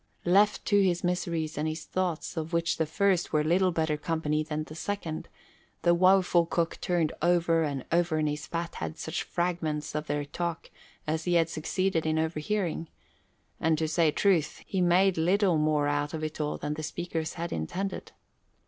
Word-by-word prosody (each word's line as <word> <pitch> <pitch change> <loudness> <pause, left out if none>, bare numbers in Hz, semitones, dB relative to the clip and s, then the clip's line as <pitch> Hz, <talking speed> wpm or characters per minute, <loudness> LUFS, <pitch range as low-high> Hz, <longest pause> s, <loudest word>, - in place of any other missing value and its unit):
Left 200 +4 +3
to 205 -1 +4
his 175 -2 +1
miseries 170 -3 -1
and 155 - 0
his 155 0 -4
thoughts, 185 -2 -2
of 160 +1 -4
which 170 0 +1
the 160 - 0
first 185 +2 +1
were 150 -1 +2
little 180 +4 +3
better 160 -2 0
company 155 -1 -1
than 155 0 -3
the 155 - -10
second, 165 -2 -4 0.5
the 175 - +5
woeful 180 -1 +4
cook 170 -1 -1
turned 170 -3 +1
over 170 -1 +3
and 140 -4 -2
over 170 -1 +2
in 155 - +1
his 150 -1 -3
fat 170 0 -3
head 80 -1 -5
such - - -3
fragments 170 -4 -2
of 150 0 -3
their 145 0 -1
talk 170 +3 -4 0.3
as 160 +1 -2
he 175 -1 +2
had 165 -1 +3
succeeded 165 +1 -1
in 155 0 +1
overhearing, 160 +1 -1 0.7
and 160 0 +2
to 160 0 0
say 160 0 +3
truth, 165 -1 +1
he 190 - -1
made 180 0 +4
little 180 0 +3
more 150 -1 +2
out 145 +1 -1
of 155 - -5
it 155 0 -3
all 150 0 -1
than 150 - -3
the 155 - -5
speakers 160 0 -3
had 170 +1 -4
intended. 180 - -4
165 Hz, 185 wpm, -28 LUFS, 155-175 Hz, 0.7 s, the